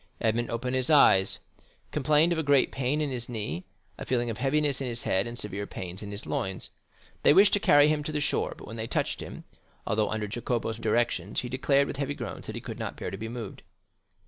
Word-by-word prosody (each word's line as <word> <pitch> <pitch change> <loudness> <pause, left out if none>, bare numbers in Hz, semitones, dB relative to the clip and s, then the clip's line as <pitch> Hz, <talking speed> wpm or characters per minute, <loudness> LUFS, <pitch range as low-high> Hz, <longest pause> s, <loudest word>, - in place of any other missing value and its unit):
Edmond 115 +1 0
opened 125 +2 -2
his 130 -1 0
eyes, 95 -11 +6 0.5
complained 150 +4 +3
of 160 -1 -1
great 145 -2 +4
pain 135 +3 0
in 145 -2 -1
his 120 -2 -4
knee, 105 -8 -4 0.3
a - - -4
feeling 120 -2 0
of 110 - -7
heaviness 140 0 +1
in 135 - -2
his 120 -1 -3
head, 95 +4 +1
and 120 0 -7
severe 100 -2 -4
pains 90 0 -7
in 105 - -6
his 100 +1 -5
loins. 95 0 -3 0.5
They - - +6
wished 200 +4 +6
to 205 - +5
carry 145 -5 +6
him 150 -1 +1
to 155 - -2
the 150 - -1
shore; 145 - 0
but - - -11
when 115 - -8
they 110 0 -3
touched - - -1
him, - - -8 0.4
although 105 0 +1
under 110 -1 -2
Jacopo's 115 +1 -2
directions, 110 -4 0
he 125 - -5
declared, 140 +2 +2
with 140 - -5
heavy 140 0 -2
groans, 120 -9 -6
that - - -5
he - - -5
could - - -7
not - - -4
bear - - -4
to - - -4
be 110 +2 -5
moved. 115 -4 -7
120 Hz, 225 wpm, -28 LUFS, 110-145 Hz, 0.5 s, eyes